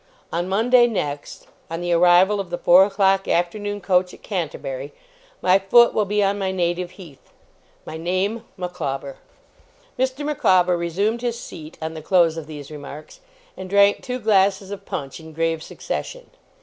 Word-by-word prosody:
On 175 +2 -1
Monday 240 +5 +4
next, 145 -10 -4 0.2
on 165 0 -4
the 175 0 -1
arrival 180 +4 +5
of 195 -3 -4
the 175 - -3
four 180 +2 +6
o'clock 195 -1 +1
afternoon 205 +4 -1
coach 180 -1 +1
at - - -22
Canterbury, - - -4 0.5
my 185 +2 +5
foot 235 +5 +5
will 210 - +1
be 205 +1 +1
on 200 +1 0
my 190 -1 -1
native 175 -1 -1
heath 165 -8 -14 0.6
my 160 - -7
name, 185 +7 -1
Micawber!' 140 -7 -4 0.8
Mr. 260 +3 -1
Micawber 185 -11 +3
resumed 195 +7 -1
his 240 -1 -2
seat 155 -8 -10
on 160 0 -4
the 160 - -7
close 170 -1 +3
of 160 -2 -7
these 150 -2 -9
remarks, 150 - -10 0.4
and 185 - -8
drank 200 +1 +4
two 250 0 -4
glasses 200 -3 +2
of 200 - -8
punch 135 +2 -5
in 160 0 -12
grave 165 0 -1
succession. - - -6
185 Hz, 160 wpm, -22 LUFS, 165-205 Hz, 0.8 s, four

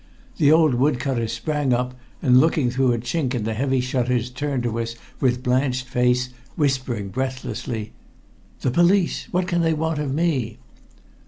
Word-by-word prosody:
The 145 -1 +4
old 160 -3 +5
wood 130 +2 +2
cutter 125 -5 -1
sprang 135 +4 -1
up, 125 +1 -1 0.3
and 125 -1 +6
looking 150 -4 +2
through 130 0 +2
a 120 - +1
chink 125 +3 -2
in 115 - -2
the 110 +1 -2
heavy 130 +3 0
shutters 125 -1 -1
turned 135 -1 -2
to 115 -1 -2
us 115 0 -3 0.2
with 125 -1 +1
blanched 125 0 +1
face, 125 0 +1 0.3
whispering 130 -8 -1
breathlessly 125 -3 -4 0.7
"The 130 - +1
police! 175 +4 +2
What 180 +1 0
can 175 -2 +1
they 165 -1 +2
want 160 0 -1
of 145 -3 -2
me?" 140 -7 0
130 Hz, 165 wpm, -23 LUFS, 120-150 Hz, 0.7 s, and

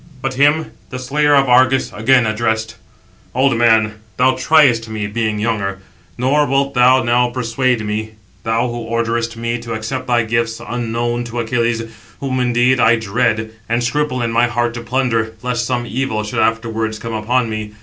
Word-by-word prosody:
But 135 0 -1
him 145 +4 +2 0.2
the 130 - -6
slayer 145 +3 +2
of 135 -1 +4
Argus 130 +1 +3
again 125 +2 +3
addressed: 110 0 -1 0.6
"Old 135 0 +3
man, 110 -2 +3 0.2
thou 130 +1 +4
triest 130 -5 +3
me, 110 -1 -3
[being] 110 0 -2
younger; 105 -3 -1 0.4
nor 145 +4 +2
wilt 140 +1 0
thou 130 +1 +4
now 120 +1 +2
persuade 120 -1 -1
me; 110 +1 -3 0.3
thou 115 +2 0
who 120 0 -5
orderest 115 0 -2
me 115 +1 -2
to 115 0 -6
accept 130 +4 -4
thy 120 -1 +2
gifts 115 0 -1
unknown 120 0 -2
to 120 0 -5
Achilles; 115 0 0 0.4
whom 130 -2 -2
indeed 125 +1 +2
I 115 0 +5
dread, 115 0 -1 0.2
and 120 +1 0
scruple 130 0 -1
in 115 - -1
my 120 +1 +3
heart 120 0 -1
to 120 - -6
plunder, 115 -3 -1
lest 120 -2 -1
some 120 -2 -1
evil 120 -3 -2
should 105 - -3
afterwards 115 -1 0
come 115 +1 -6
upon 115 +3 0
me. 110 -1 -5
120 Hz, 170 wpm, -17 LUFS, 115-125 Hz, 0.6 s, I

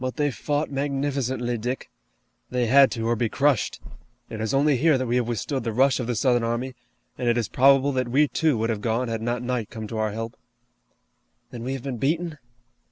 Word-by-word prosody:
But 130 0 -3
they 145 -2 +1
fought 145 +4 -2
magnificently, 135 -3 -1
Dick! 125 +4 -4 0.6
They 125 -1 0
had 135 +3 +6
to, 115 -2 -3
or 120 - +2
be 115 0 0
crushed! 140 -2 +1 0.5
It 110 - -5
is 110 - -1
only 140 0 +3
here 155 +2 +4
that 130 - -2
we 120 +1 +1
have 120 -2 0
withstood 120 +3 -2
the 115 - -2
rush 130 +5 +3
of 125 - -3
the 120 - -1
Southern 120 +1 +2
army, 120 +3 -2 0.5
and 120 - +1
it 120 - +2
is 115 - 0
probable 135 +1 +4
that 130 -2 -1
we, 145 +5 +4
too, 155 -3 +1
would 115 +1 0
have 105 -2 -3
gone 115 +3 0
had 115 -1 -3
not 120 +1 -2
night 125 -3 -2
come 110 -2 -7
to 110 - -4
our 110 -1 0
help." 115 +2 -5 1.2
"Then 120 - -7
we 130 +3 -3
have 135 -2 -5
been 135 -3 -4
beaten?" 160 +3 -1
125 Hz, 220 wpm, -25 LUFS, 115-140 Hz, 1.2 s, had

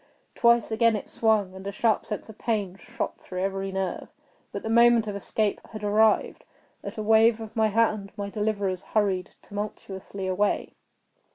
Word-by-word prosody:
Twice 235 -1 +3
again 225 0 +3
it 210 - -5
swung, 215 -4 +1
and 190 +1 -8
a - - -2
sharp 220 +2 +1
sense 210 - -5
of 220 -1 -13
pain 205 -5 -1
shot 235 +3 -5
through 185 0 -5
every 195 0 -2
nerve. 190 -1 -3 0.4
But - - -5
the 220 - -3
moment 235 -1 +5
of 205 -1 -4
escape 205 +1 -1
had 215 -1 -7
arrived. 215 +1 +2 0.4
At 200 +3 -7
a 215 - -2
wave 225 +1 +5
of 220 -1 -8
my 220 -1 +3
hand 215 -2 +1
my 200 0 -4
deliverers 205 -4 -1 0.2
hurried 195 -3 0
tumultuously 200 -2 -6
away. 190 +2 0
210 Hz, 170 wpm, -26 LUFS, 195-220 Hz, 0.4 s, moment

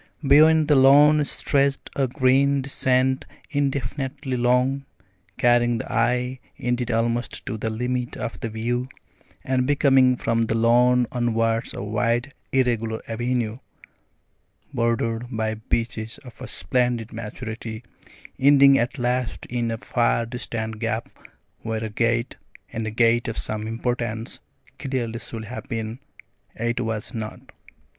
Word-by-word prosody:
Beyond 155 +2 +6
the 150 - +5
lawn 145 +3 +6
stretched 140 0 0
a 135 -2 +1
green 135 +2 +2
descent 130 -1 +1 0.3
indefinitely 140 -1 -2
long, 125 +3 +1 0.5
carrying 120 -1 +3
the - - -6
eye 125 +2 +1 0.2
indeed 125 -1 -1
almost 115 +1 -1
to - - -3
the 110 +1 -3
limit 125 +2 -2
of - - -5
the 115 - -3
view, 120 +3 -2 0.5
and 130 -1 0
becoming 135 -3 +4
from 115 -1 0
the 110 - -1
lawn 120 +2 +4
onwards 115 -2 0
a - - -5
wide 115 +6 0 0.2
irregular 115 -4 0
avenue, 120 0 -2 1.1
bordered 115 -1 0
by 110 -2 -1
beeches 110 +1 -3
of 125 - -13
a - - -6
splendid 120 +4 0
maturity, 110 0 -6 0.6
ending 140 0 +6
at 120 +5 -1
last 125 -1 -1
in 120 -1 -1
a 115 - -2
far 115 0 +1
distant 110 -2 -5
gap 115 0 -2 0.5
where 110 0 -3
a 110 - -4
gate 115 +2 0 0.4
and 115 -1 -3
a - - -1
gate 115 +1 +2
of 115 - -4
some 110 0 -3
importance 115 -1 -3 0.4
clearly 120 -4 -3
should 115 -1 -6
have 120 +4 -8
been, 115 +1 -4 0.6
yet 120 +1 -1
was 110 0 -3
not. 110 -2 -7
120 Hz, 130 wpm, -24 LUFS, 115-130 Hz, 1.1 s, Beyond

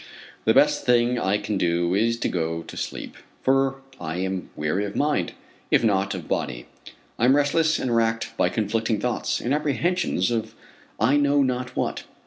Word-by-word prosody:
The - - +4
best - - +4
thing 120 0 +3
I 95 +2 +1
can 105 -1 -3
do, 85 0 +1
is 115 +4 +2
to - - +1
go 80 -1 -2
to - - -11
sleep, - - -5 0.3
for 135 0 +2 0.2
I 80 0 -4
am 95 0 -3
weary 75 +7 -1
of 100 - -6
mind, 150 +1 0 0.4
if - - +3
not 100 -3 +1
of 90 -4 -7
body. - - -2 0.5
I 120 - +3
am 130 +2 +5
restless 155 +2 +2
and 120 -2 -1
racked 115 0 0
by - - +2
conflicting 110 0 -1
thoughts, 125 -1 -1
and 125 - -1
apprehensions 150 - 0
of 110 -2 -2 0.4
I 130 +7 +4
know 145 0 +3
not 125 -1 -2
what. - - -2
115 Hz, 175 wpm, -24 LUFS, 95-135 Hz, 0.5 s, am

